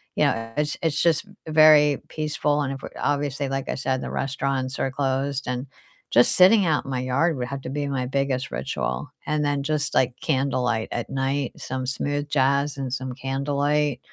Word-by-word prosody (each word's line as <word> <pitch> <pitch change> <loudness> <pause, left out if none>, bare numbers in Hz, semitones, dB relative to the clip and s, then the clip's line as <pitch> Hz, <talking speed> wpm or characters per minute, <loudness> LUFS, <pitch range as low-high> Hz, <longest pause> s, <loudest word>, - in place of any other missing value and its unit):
you - - +3
know, 115 0 -1
it's 150 0 -1
it's 155 -2 +1
just 170 +2 +2 0.2
very 155 -2 +6
peaceful 150 -1 0
and 135 -2 -1
if 135 - -8
we - - -6
obviously, 145 -1 -1
like 135 0 -3
I - - -2
said, 130 -1 -1
the - - -5
restaurants 135 -1 -2
are 135 - -1
closed, 135 0 -1
and 125 +1 -2 0.5
just 120 +1 +5
sitting 195 +3 +6
out 150 -3 +1
in 135 - -6
my 125 - -1
yard 140 +6 +1
would 125 -1 -3
have 140 +1 -5
to 130 - -6
be 145 0 -2
my 130 -2 -1
biggest 135 0 -1
ritual. 65 -1 -3 0.2
And 150 0 0
then 145 -1 0
just, 150 0 -1
like, 125 -1 +3
candlelight 130 -6 0
at 120 - -3
night, 135 0 -1
some 130 0 -4
smooth 145 +2 -2
jazz 140 +1 +1
and 130 -2 -4
some 130 -1 -3
candlelight. 140 +1 0
140 Hz, 190 wpm, -24 LUFS, 130-145 Hz, 0.5 s, very